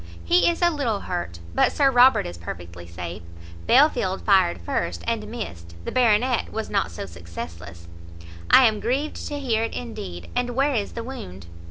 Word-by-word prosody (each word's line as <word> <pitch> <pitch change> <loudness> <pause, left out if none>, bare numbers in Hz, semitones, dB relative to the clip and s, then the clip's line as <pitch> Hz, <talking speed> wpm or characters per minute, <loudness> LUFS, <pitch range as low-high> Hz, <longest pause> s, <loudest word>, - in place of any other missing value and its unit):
"He 350 0 +4
is 340 +1 -1
a 345 - +5
little 245 -10 -1
hurt, 130 - -5
but - - +3
Sir 275 -2 +3
Robert 250 +1 +6
is 85 - -6
perfectly 85 0 -8
safe. 85 0 -7 0.5
Belfield 235 -8 +3
fired 190 - +3
first, 85 0 -3
and - - -2
missed; 85 0 -7
the - - -3
Baronet 245 0 +2
was 220 0 -4
not 200 -1 +1
so 85 - -6
successless." 85 -1 -9 0.6
"I 260 - +8
am 215 -2 +2
grieved 275 +7 -2
to 290 - -4
hear 235 -5 0
it, 230 - -3
indeed! 85 +2 -7
And 245 -1 -1
where 275 +2 +2
is 210 -5 -2
the 230 - -5
wound?" 95 - -8
200 Hz, 175 wpm, -24 LUFS, -, 0.6 s, I